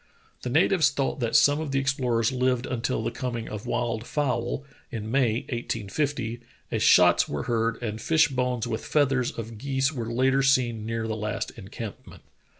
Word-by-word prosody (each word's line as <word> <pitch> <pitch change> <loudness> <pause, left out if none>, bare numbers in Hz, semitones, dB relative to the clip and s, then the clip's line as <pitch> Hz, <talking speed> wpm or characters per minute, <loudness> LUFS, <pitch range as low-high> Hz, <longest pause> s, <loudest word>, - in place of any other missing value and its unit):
The 125 - -4
natives 160 +3 +4
thought 140 0 -2
that 115 -2 -1
some 150 -1 +5
of 155 - -4
the 135 - 0
explorers 125 -3 +1
lived 125 -1 +1
until 120 -2 -2
the - - -1
coming 120 -3 -4
of 105 -1 -6
wild 120 -1 -2
fowl, 130 -3 -1 0.3
in 110 -1 -5
May, 120 -4 +2
1850, 120 +1 -3 0.3
as - - -1
shots - - +5
were 75 - -3
heard 115 -1 0
and 110 -1 -3
fish 160 +4 +4
bones 125 -4 -1
with 115 -2 -3
feathers 135 -4 +2
of 115 -1 -7
geese 135 +2 0
were 115 -4 -4
later 130 +3 +3
seen 120 -5 +2
near 115 0 -2
the 110 - -2
last 105 0 -3
encampment. 105 0 -9
120 Hz, 170 wpm, -26 LUFS, 115-135 Hz, 0.3 s, some